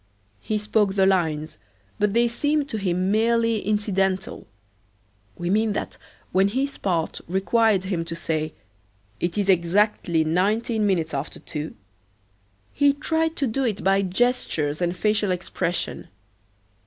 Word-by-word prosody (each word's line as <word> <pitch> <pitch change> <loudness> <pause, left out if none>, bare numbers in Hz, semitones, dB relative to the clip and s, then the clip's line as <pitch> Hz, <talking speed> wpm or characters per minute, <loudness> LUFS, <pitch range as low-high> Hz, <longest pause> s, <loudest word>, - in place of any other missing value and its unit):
He 215 - -2
spoke 210 -1 +1
the 190 -1 +4
lines, 160 -5 0 0.4
but 210 0 +1
they 235 0 +4
seemed 290 +5 0
to 220 - -3
him 185 0 0
merely 230 +1 +2
incidental. 195 -2 -1 0.9
We 175 +1 -2
mean 215 +1 +2
that - - -4 0.3
when 190 +2 +4
his 265 +7 -2
part 170 -4 -1
required 195 +2 +2
him 185 -3 -2
to 165 0 -5
say, 155 -1 -2 0.7
"It 175 +3 -2
is 200 -1 +1
exactly 175 -2 +2
nineteen 210 +6 +1
minutes 165 -5 0
after - - -4
two," 155 -1 -5 1.0
he 285 -1 +4
tried 320 +2 -1
to 280 - 0
do 265 +3 -1
it 220 -6 -1
by 195 +1 +3
gestures 185 - 0
and 175 +1 0
facial 210 0 +1
expression. 180 -1 -2
195 Hz, 135 wpm, -24 LUFS, 175-225 Hz, 1.0 s, the